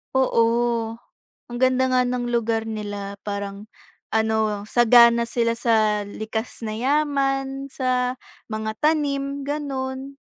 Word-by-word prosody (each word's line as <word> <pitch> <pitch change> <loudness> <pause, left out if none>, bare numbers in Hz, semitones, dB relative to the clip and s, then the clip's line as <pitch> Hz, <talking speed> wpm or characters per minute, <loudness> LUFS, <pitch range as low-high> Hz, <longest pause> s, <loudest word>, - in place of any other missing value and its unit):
Oo, 230 -2 +2 0.5
ang 240 0 -6
ganda 260 0 +3
nga 255 -1 +3
ng 250 0 -2
lugar 225 -1 0
nila, 205 -2 -5
parang 200 +1 -5 0.4
ano, 220 -2 0
sagana 235 0 +6
sila 235 0 0
sa 220 -3 +2
likas 220 +3 -5
na 215 - -3
yaman, 270 +1 0
sa 255 -1 -1 0.3
mga 220 0 -3
tanim, 280 -2 0
gano'n. 275 -2 -4
240 Hz, 110 wpm, -23 LUFS, 220-265 Hz, 0.5 s, sagana